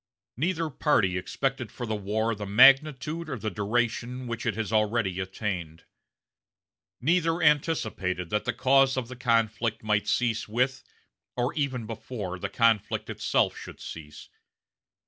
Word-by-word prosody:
Neither 165 Hz, +3 st, -1 dB
party 110 Hz, -, +2 dB
expected 125 Hz, +6 st, -2 dB
for 120 Hz, -, -6 dB
the 110 Hz, -1 st, -2 dB
war 110 Hz, +3 st, -1 dB
the 105 Hz, -1 st, -6 dB
magnitude 135 Hz, +7 st, +4 dB
or 130 Hz, -, -3 dB
the 110 Hz, 0 st, -3 dB
duration 120 Hz, +5 st, -1 dB
which 115 Hz, -2 st, -4 dB
it -, -, 0 dB
has 110 Hz, -1 st, -3 dB
already 105 Hz, -3 st, +1 dB
attained. 95 Hz, -4 st, -4 dB, 1.2 s
Neither 165 Hz, +3 st, +2 dB
anticipated 115 Hz, -, +1 dB
that 105 Hz, 0 st, 0 dB
the 120 Hz, -, +1 dB
cause 135 Hz, +3 st, +3 dB
of 125 Hz, -2 st, -3 dB
the 130 Hz, -, -7 dB
conflict 115 Hz, -2 st, 0 dB
might 105 Hz, -1 st, +1 dB
cease 115 Hz, -2 st, 0 dB
with, 125 Hz, +4 st, 0 dB, 0.5 s
or 125 Hz, +2 st, 0 dB
even 135 Hz, -6 st, -2 dB
before, 105 Hz, -4 st, -6 dB
the -, -, -3 dB
conflict 115 Hz, -4 st, +1 dB
itself -, -, +1 dB
should -, -, -10 dB
cease. 75 Hz, -2 st, -10 dB
115 Hz, 140 wpm, -27 LUFS, 105-130 Hz, 1.2 s, magnitude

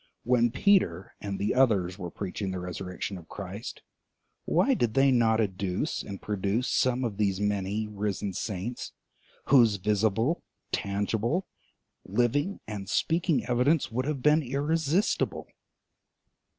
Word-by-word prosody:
When 120 Hz, -1 st, +3 dB
Peter 120 Hz, -, +2 dB
and 100 Hz, -1 st, -3 dB
the 100 Hz, -, 0 dB
others 100 Hz, -8 st, +2 dB
were 90 Hz, -2 st, -4 dB
preaching 100 Hz, +2 st, -4 dB
the 95 Hz, -, -3 dB
resurrection 90 Hz, +1 st, -5 dB
of 85 Hz, -, -16 dB
Christ, 100 Hz, +4 st, -7 dB, 0.6 s
why 275 Hz, -, +3 dB
did 120 Hz, -, 0 dB
they 135 Hz, 0 st, +5 dB
not 115 Hz, -3 st, +3 dB
adduce 95 Hz, -3 st, -1 dB
and 100 Hz, -2 st, -7 dB
produce 105 Hz, +4 st, -1 dB
some 130 Hz, 0 st, +2 dB
of 110 Hz, -5 st, -2 dB
these 100 Hz, -3 st, +1 dB
many, 105 Hz, +1 st, -1 dB
risen 100 Hz, -1 st, -3 dB
saints, 105 Hz, +5 st, -4 dB, 0.6 s
whose 120 Hz, -6 st, +6 dB
visible, 105 Hz, -, +1 dB, 0.3 s
tangible, 110 Hz, -, -1 dB, 0.6 s
living 120 Hz, -, 0 dB
and 100 Hz, -3 st, -6 dB
speaking 165 Hz, 0 st, +1 dB
evidence 125 Hz, 0 st, +2 dB
would 130 Hz, +3 st, -1 dB
have 140 Hz, -4 st, -2 dB
been 150 Hz, +1 st, +5 dB
irresistible? 150 Hz, -, 0 dB
110 Hz, 125 wpm, -28 LUFS, 100-130 Hz, 0.6 s, whose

